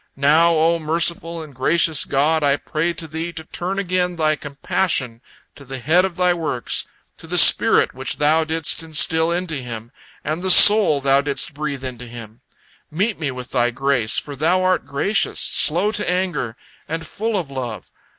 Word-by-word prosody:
Now, 155 +5 +3
O 165 +2 +2
merciful 165 +1 -1
and 150 -2 -13
gracious 155 +3 +1
God, 150 +3 0
I 140 -1 +3
pray 165 +3 -3
to 160 0 -7
Thee 160 +2 -5
to 160 - -8
turn 180 +4 -5
again 180 -2 -1
Thy 155 -2 +1
compassion 140 -4 -2 0.3
to 140 - -15
the 135 0 -8
head 165 +8 +2
of 190 -3 -5
Thy 180 0 +2
works, 155 -8 -3 0.3
to - - -14
the - - -2
spirit - - +5
which - - -5
Thou 155 +2 +2
didst 160 +1 -2
instil 160 +1 +2
into 175 -3 -3
him, 120 -3 -8 0.3
and 155 +3 -4
the 190 - -2
soul 195 -6 +7
Thou 135 0 +2
didst 140 0 -4
breathe 140 -2 -5
into 125 -2 -8
him. 115 -1 -12 0.5
Meet 200 +7 -2
me 150 -4 -2
with 125 -1 -8
Thy 120 -2 +1
grace, 125 -3 0
for 145 - -5
Thou 170 +6 +1
art 185 -4 0
gracious, 145 +9 -1
slow 180 +7 +2
to 210 -3 -2
anger, 175 -11 -2 0.3
and 165 +1 -5
full 215 +6 -3
of 160 -7 -5
love. 120 -7 -7
155 Hz, 180 wpm, -19 LUFS, 135-175 Hz, 0.5 s, soul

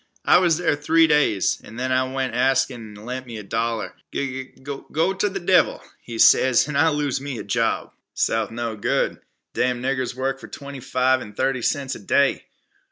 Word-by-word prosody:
I - - +6
was 170 -4 +3
there 170 -4 +1
three 160 +3 +4
days, 150 - +2
and 115 +3 -10
then 130 0 -1
I 130 0 +1
went 130 -2 -2
an' 120 - -2
ask 135 +1 +3
'im 110 -4 -9
t' 105 - -12
lend 125 +3 -6
me 115 -2 -7
a 105 - -7
dollar. 115 +2 -2 0.2
'G 135 -1 -3
g - - -21
go 155 +6 -2
ter 205 +2 0
the 195 0 -4
devil,' 180 +1 +3 0.2
he 115 -1 -8
ses, 130 +3 +5
an' 150 - -4
I 160 +3 +4
lose 145 -3 -1
me 140 -4 -5
job." - - -1 0.2
"South 110 -1 0
no 115 -1 -4
good. 105 - 0 0.3
Damn 125 -1 0
niggers 130 -1 -2
work 135 +1 -2
for - - -10
twenty 140 -1 -9
five 130 0 +1
an' 105 - -9
thirty 130 +3 0
cents 135 +2 -1
a - - -7
day. 140 +7 +1
130 Hz, 205 wpm, -23 LUFS, 120-145 Hz, 0.3 s, I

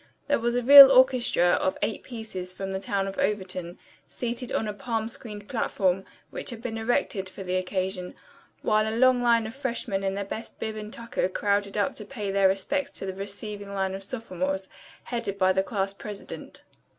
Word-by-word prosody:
There 285 - +2
was 235 +1 0
a 245 - +1
real 275 +1 +12
orchestra 255 -8 +4
of 185 - +1
eight 220 - -1
pieces 220 -7 -7
from 195 +1 -5
the 190 - -2
town 195 0 -1
of 195 - -6
Overton, 185 -3 -2 0.3
seated 245 +1 -4
on 220 - 0
a 210 - -3
palm 225 +1 -2
screened 220 -5 -9
platform 190 -5 0 0.3
which - - -4
had 235 - -6
been 225 -1 -4
erected 220 -4 0
for 195 - -9
the 180 0 -2
occasion; 185 0 -2 0.5
while 215 +1 +2
a 225 - -3
long 255 0 +5
line 235 -2 +3
of 220 - -6
freshmen 240 -7 -2
in 195 0 -1
their 200 0 -3
best 220 +3 -7
bib 220 -1 -3
and 215 0 -7
tucker 230 -5 -2
crowded 200 +1 0
up 250 +6 0
to - - -8
pay 210 -7 -4
their 195 0 +4
respects 270 +9 -1
to - - -4
the 190 - -3
receiving 200 +1 -7
line 190 -1 -1
of 195 - -5
sophomores, 190 -4 -3 0.3
headed 230 -5 -3
by 185 -1 +3
the 190 - +2
class 195 -1 -2
president. 205 0 -9
205 Hz, 195 wpm, -26 LUFS, 190-235 Hz, 0.5 s, real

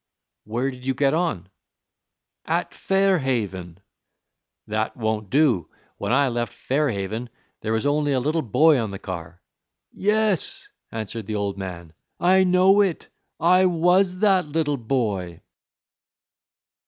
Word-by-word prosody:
"Where 120 +6 -2
did 125 -1 -12
you 130 0 -1
get 140 +1 +2
on?" 160 - -1 1.0
"At - - -1
Fair 195 -1 +2
Haven." 95 - -3 0.9
"That 110 +1 -2
won't 110 -3 -2
do! 130 - +2 0.3
When - - -3
I 140 +2 +3
left 120 -2 -3
Fair 145 +2 0
Haven 110 +3 -4 0.3
there 110 - -3
was 110 +2 0
only 145 0 +1
a 130 - +2
little 155 +5 0
boy 150 +4 +4
on 110 -2 -2
the 100 - -6
car." 85 -2 -8 0.5
"Yes," 210 -2 0 0.2
answered 110 -1 -5
the 110 - -3
old 100 -1 -2
man, 85 -4 -7 0.3
"I 190 +2 +4
know 185 +2 +5
it. 190 -5 -1 0.3
I 185 +3 +5
was 180 +2 +2
that 190 -6 +3
little 145 -1 0
boy." 110 -9 -2
130 Hz, 135 wpm, -23 LUFS, 105-170 Hz, 1.0 s, know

